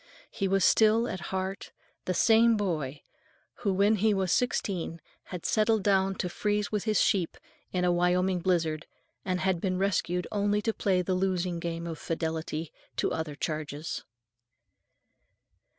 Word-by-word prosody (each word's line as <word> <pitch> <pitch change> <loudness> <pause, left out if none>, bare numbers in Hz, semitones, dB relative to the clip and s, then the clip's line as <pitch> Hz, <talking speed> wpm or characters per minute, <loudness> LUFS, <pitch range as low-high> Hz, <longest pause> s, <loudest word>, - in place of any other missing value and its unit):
He 195 - -1
was 195 -1 +3
still, 220 +2 +4
at 185 - -4
heart, 190 +1 -3 0.3
the 185 - -1
same 225 +2 +5
boy 155 -9 -2 0.5
who, 200 - 0
when 200 +3 +3
he 210 +1 +3
was 190 -2 0
sixteen, 185 -8 0 0.3
had 180 -3 -7
settled 215 -1 +2
down 195 -1 +2
to 180 - -2
freeze 210 +3 -1
with 210 -1 -1
his 215 -2 +2
sheep 180 -5 +1 0.3
in 180 -1 0
a 175 - +3
Wyoming 180 +1 +2
blizzard, 165 -3 0 0.4
and 185 -1 -1
had 190 -3 +1
been 185 -2 0
rescued 180 -2 0
only 205 0 +1
to 225 - 0
play 185 -4 +1
the 185 - -1
losing 185 -2 0
game 170 0 -4
of 165 -2 -5
fidelity 160 -1 -3 0.2
to - - 0
other 160 -2 -3
charges. 155 0 -4
185 Hz, 150 wpm, -29 LUFS, 170-205 Hz, 0.5 s, same